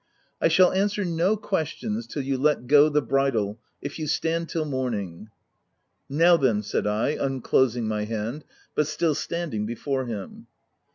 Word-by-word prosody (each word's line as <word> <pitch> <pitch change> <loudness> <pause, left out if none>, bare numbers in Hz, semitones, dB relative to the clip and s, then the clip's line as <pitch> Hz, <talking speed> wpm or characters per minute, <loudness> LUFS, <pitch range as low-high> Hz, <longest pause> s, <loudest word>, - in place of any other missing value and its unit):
" - - -43
I - - +5
shall 180 +3 +5
answer 200 +1 0
no 175 +5 +1
questions 210 +4 -3
till 145 - -4
you 135 0 -1
let 140 -1 +1
go 145 +3 +6
the 150 -1 +1
bridle, 115 -5 0
— - - -47
if 140 +3 -5
you 155 - -3
stand 165 +2 -1
till 160 -2 -1
morning." 110 - -3 0.8
u 140 - -4
Now 170 +1 +6
then/' 115 -8 +1
said 105 - -1
I, 105 +5 +1
unclosing 130 -4 +1
my 105 -1 -1
hand, 115 +6 -4 0.3
but 150 - +1
still 155 +1 +1
standing 150 -10 -3
before 130 +3 -2
him. 105 -5 -7
140 Hz, 170 wpm, -25 LUFS, 115-165 Hz, 0.8 s, go